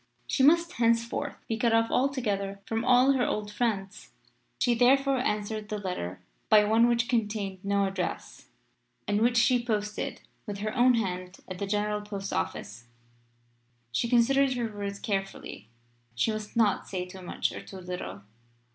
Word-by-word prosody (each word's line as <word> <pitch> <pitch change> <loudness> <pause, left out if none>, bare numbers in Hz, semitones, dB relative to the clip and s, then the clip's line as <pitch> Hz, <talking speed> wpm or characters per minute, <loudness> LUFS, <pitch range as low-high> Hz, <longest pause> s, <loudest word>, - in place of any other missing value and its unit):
She 120 - 0
must 335 +5 +5
henceforth 235 +1 0
be 225 - -1
cut 230 +1 +2
off 225 0 +3
altogether 210 -7 0
from 225 0 -2
all 250 +2 +5
her 260 -2 +2
old 210 -2 -2
friends. 205 -3 -2 0.5
She 245 - +3
therefore 265 +3 +4
answered 215 -3 -2
the 210 - -2
letter 95 - -4 0.3
by 215 -1 +7
one 225 +3 +4
which 235 0 +2
contained 210 -5 -1
no 200 0 +1
address, 195 0 -4 0.6
and 205 +1 +1
which 240 +1 +3
she 240 +1 +4
posted 210 -3 -2 0.3
with 205 -1 -4
her 215 +3 -3
own 250 0 +5
hand 185 -4 -3
at 185 -1 -7
the 200 - -2
General 210 +1 0
Post 200 -2 -5
Office. 85 +6 -4 1.1
She 230 - 0
considered 260 +3 +4
her 230 -3 -3
words 200 -1 -4
carefully. 195 - -4 0.5
She 170 - +1
must 215 -1 -6
not 215 -4 +2
say 180 -2 -3
too 185 +1 -11
much 180 - -2
or - - -7
too 195 - -10
little. 175 - -6
210 Hz, 160 wpm, -28 LUFS, 195-240 Hz, 1.1 s, by